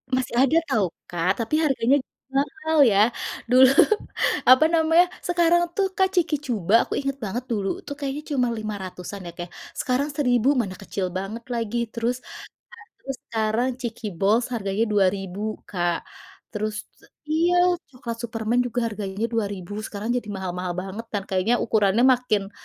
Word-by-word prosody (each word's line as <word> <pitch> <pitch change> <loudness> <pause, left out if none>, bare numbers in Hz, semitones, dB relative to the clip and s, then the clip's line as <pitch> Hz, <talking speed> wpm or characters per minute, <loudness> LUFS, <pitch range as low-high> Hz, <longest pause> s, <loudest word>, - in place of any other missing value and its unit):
Masih 255 -2 -2
ada 275 +4 +4
tahu 205 -5 +2 0.2
Kak 175 +1 +1
tapi 230 - -1
harganya 270 -2 +3 0.3
mahal 310 +3 -1
ya 215 -1 +4 0.4
dulu 260 +1 +8 0.8
apa 260 +5 +8
namanya? 325 +2 +5 0.2
Sekarang 345 0 +3
tuh 390 -1 +2
Kak 380 - +4
chiki 330 -3 +2
Chuba 210 -5 -1
aku - - -4
inget 275 -1 -2
banget 230 +5 -3
dulu 200 -3 0 0.2
tuh 285 - -5
kayaknya 285 +1 -3
cuma 250 -2 +2
Rp500-an 200 -3 -6
ya 170 - -6
Kak 175 0 -6 0.3
sekarang 265 +1 0
Rp1000 250 -4 +2
Mana 190 -4 -5
kecil 195 -1 -3
banget 215 +5 -5
lagi 230 -1 -2
terus 235 +1 -1
nah - - -11 0.6
terus 270 -1 -6
sekarang 225 +2 0
chiki 230 -2 -4
Balls 215 +5 +3
harganya 200 -1 0
Rp2000 195 -1 +1 0.3
Kak, 175 -2 -1 0.5
terus 215 0 -3 0.5
iya 335 +3 +2 0.4
coklat 235 -3 -6
Superman 225 +1 -1
juga 245 +1 -2
harganya 205 -1 -4
Rp2000 205 -2 -3
sekarang 210 +3 -5
jadi 240 -3 -3
mahal-mahal 180 -1 -3
banget 190 +5 -5
kan? 200 -2 -1
Kayaknya 190 +5 +2
ukurannya 215 0 +2
makin, 245 -6 +2
225 Hz, 150 wpm, -24 LUFS, 195-260 Hz, 0.8 s, dulu